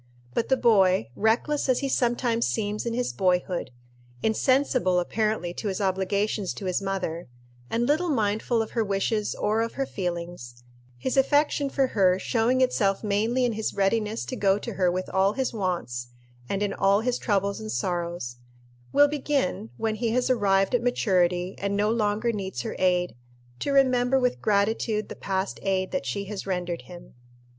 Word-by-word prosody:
But 230 - -1
the 265 - +4
boy, 190 - +3
reckless 245 - +1
as 255 - +2
he 275 - -1
sometimes 240 -2 +1
seems 210 +1 -2
in 230 - -1
his 250 0 -1
boyhood, 180 -1 0 0.5
insensible 250 -5 +2
apparently 210 -1 -1
to 210 - -5
his 190 -2 -2
obligations 195 +1 0
to 200 - -7
his 185 +1 0
mother, 185 -4 -3 0.4
and 235 +1 0
little 320 +4 +1
mindful 225 -2 +1
of 220 - -10
her 230 - +1
wishes 205 +1 -1
or 215 +2 0
of 230 0 -2
her 270 - -1
feelings 170 - -5 0.3
his 260 - -2
affection 285 +1 +3
for 270 0 +2
her 190 -7 +3
showing 240 +5 +1
itself 200 -6 +1
mainly 220 +5 +1
in 240 - 0
his 220 0 -3
readiness 210 +2 0
to 255 - -5
go 195 -4 +2
to 235 +2 -6
her 185 -2 +2
with 185 +1 -3
all 195 +2 +2
his 260 0 -2
wants, 170 - -3 0.4
and 200 +1 -1
in 200 -1 -1
all 195 +1 +3
his 245 +1 -1
troubles 200 -1 0
and 215 0 -6
sorrows 175 -9 -3 0.5
will 290 - +6
begin, 280 - -1
when 220 -1 -1
he 225 +2 -1
has 250 +3 +1
arrived 195 -4 +2
at 245 - +3
maturity 185 -6 +1
and 200 0 -1
no 210 +1 +2
longer 220 +1 +1
needs 190 - -4
her - - -4
aid, 180 -1 +2 0.5
to 285 - -1
remember 260 -1 +3
with 250 -1 0
gratitude 215 +1 +1
the - - -6
past 190 0 -3
aid 190 -1 0
that 275 - -2
she 200 -1 -2
has 200 -1 -6
rendered 180 -2 -2
him. 175 -1 -12
210 Hz, 175 wpm, -26 LUFS, 190-240 Hz, 0.5 s, will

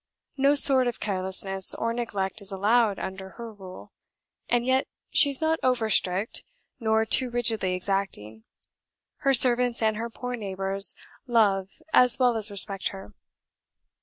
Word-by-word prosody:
No 280 +1 +2
sort 265 -3 +4
of 240 - -4
carelessness 190 -1 +2
or 230 0 -3
neglect 220 -4 -4
is 200 0 -3
allowed 210 +2 +1
under 190 0 -7
her 230 -2 -9
rule, 190 -3 -13 0.6
and 240 0 0
yet 260 +1 0 0.2
she 285 - +6
is 275 - -5
not 320 0 -1
over 235 -4 0
strict, 190 +3 0 0.4
nor 220 -1 0
too 255 +3 +2
rigidly 225 -6 -1
exacting: 180 - -5 0.7
her 275 -2 +2
servants 245 -1 +5
and 220 -1 0
her 230 +1 -5
poor 250 +2 -7
neighbours 195 -3 -4 0.3
love 200 -5 +1 0.2
as 250 -2 +5
well 250 -2 +2
as 215 -1 +2
respect 195 -1 -2
her. 195 +1 -9
220 Hz, 145 wpm, -25 LUFS, 195-245 Hz, 0.7 s, she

